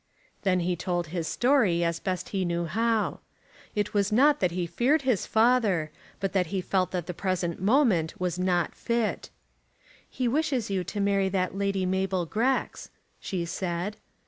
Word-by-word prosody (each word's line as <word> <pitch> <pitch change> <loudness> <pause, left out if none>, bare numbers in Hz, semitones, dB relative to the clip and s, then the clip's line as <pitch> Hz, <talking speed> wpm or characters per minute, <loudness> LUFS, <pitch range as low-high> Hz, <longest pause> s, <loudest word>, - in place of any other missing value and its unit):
Then 185 -3 +2
he 180 +1 0
told 175 -1 -2
his 170 -3 -2
story, 240 -10 +2
as 170 0 0
best 185 -2 -3
he 195 -2 -1
knew 170 -1 -1
how. 225 +5 0 0.6
It 210 -1 -1
was 205 0 +1
not 285 +6 +4
that 180 - +2
he 175 0 -2
feared 270 - +1
his 250 -8 +1
father, 220 -9 +2 0.3
but 195 -1 -2
that 185 -3 +2
he 190 +3 -2
felt 185 0 0
that 180 -3 -3
the 180 - -5
present 180 -2 -2
moment 200 - +2
was 180 -1 -2
not 180 -2 +1
fit. 235 -5 -2 0.8
"He 255 -1 -2
wishes 260 -5 0
you 190 -2 0
to 205 - -5
marry 200 -1 +2
that 185 -1 -1
Lady 195 -1 0
Mabel 190 -1 0
Grex," 240 +10 -1 0.3
she 180 -3 -3
said. 175 +3 -3
190 Hz, 170 wpm, -27 LUFS, 175-220 Hz, 0.8 s, not